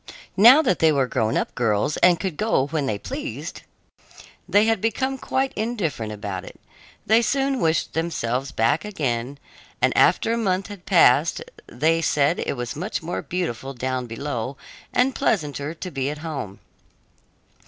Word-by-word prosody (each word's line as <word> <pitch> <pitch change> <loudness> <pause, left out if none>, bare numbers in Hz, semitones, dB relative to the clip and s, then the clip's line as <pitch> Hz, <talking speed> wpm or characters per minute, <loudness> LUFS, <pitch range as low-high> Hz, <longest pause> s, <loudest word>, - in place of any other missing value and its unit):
Now 245 +10 +8
that 185 - +1
they 160 -1 +5
were 140 -3 +2
grown 110 -3 0
up - - -2
girls 115 +4 0
and 175 -1 +4
could 190 -5 -3
go 215 -8 +1
when 145 -1 -2
they 105 - -1
pleased, - - -6 0.9
they 205 +4 +4
had 225 -3 +1
become 265 +4 -1
quite 265 +1 -1
indifferent 195 - -2
about 100 -3 -5
it. - - -12 0.5
They 225 +2 +4
soon 270 +2 0
wished 160 -3 0
themselves 135 -5 -2
back 115 +8 +1
again, 135 - -3 0.4
and - - +2
after 225 - +3
a - - 0
month 195 -2 -1
had 200 -3 -11
passed 165 -4 +4 0.2
they 160 +6 +1
said 150 +1 +2
it - - -2
was 120 -1 -4
much 180 +3 -4
more 170 +2 -3
beautiful 135 -7 -4
down 130 0 -3
below 130 +1 -4 0.3
and 255 +2 +2
pleasanter 150 - -1
to 180 +2 -7
be 135 -1 -2
at 150 - -5
home. 110 -11 -6
160 Hz, 160 wpm, -23 LUFS, 130-200 Hz, 0.9 s, Now